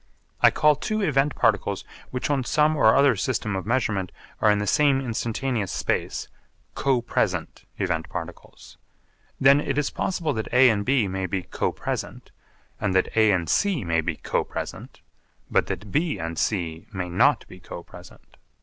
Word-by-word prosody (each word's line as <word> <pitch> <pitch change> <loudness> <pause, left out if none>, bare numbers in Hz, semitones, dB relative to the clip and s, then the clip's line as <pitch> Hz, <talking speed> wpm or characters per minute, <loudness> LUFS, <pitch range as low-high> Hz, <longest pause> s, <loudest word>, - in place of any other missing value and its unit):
I - - +8
call 150 0 +3
two 215 +8 -2
event 145 -6 +1
particles - - +1 0.2
which 125 +3 -2
on 135 -2 +1
some 150 +5 +2
or 110 -6 +5
other 140 0 +5
system 110 -6 -2
of 95 +1 -4
measurement 105 -6 0 0.3
are 110 - +5
in 105 - +4
the 105 - -1
same 140 +4 +3
instantaneous 120 -3 -2
space - - -2 0.5
'co 130 -4 +1
present' 120 - -2
event 90 -4 -2
particles. - - -9 0.6
Then 140 +2 +6
it 140 -1 -2
is 150 -1 0
possible 175 -4 -1
that 110 -1 -4
A 125 0 +6
and 100 -2 -1
B 125 -3 +2
may 95 0 -3
be 95 +1 -2
co - - -2
present, - - -5 0.5
and 100 -3 -1
that 95 - +1
A 110 -1 +5
and 90 -4 0
C 180 - +1
may 85 -1 +1
be 80 0 -2
co - - -1
present, - - -7 0.5
but - - +2
that 100 -1 -5
B 155 - 0
and 80 0 -4
C 85 -6 -2
may 95 -3 -4
not 85 - +3
be - - -13
co - - -9
present. - - -15
115 Hz, 175 wpm, -24 LUFS, 95-140 Hz, 0.6 s, I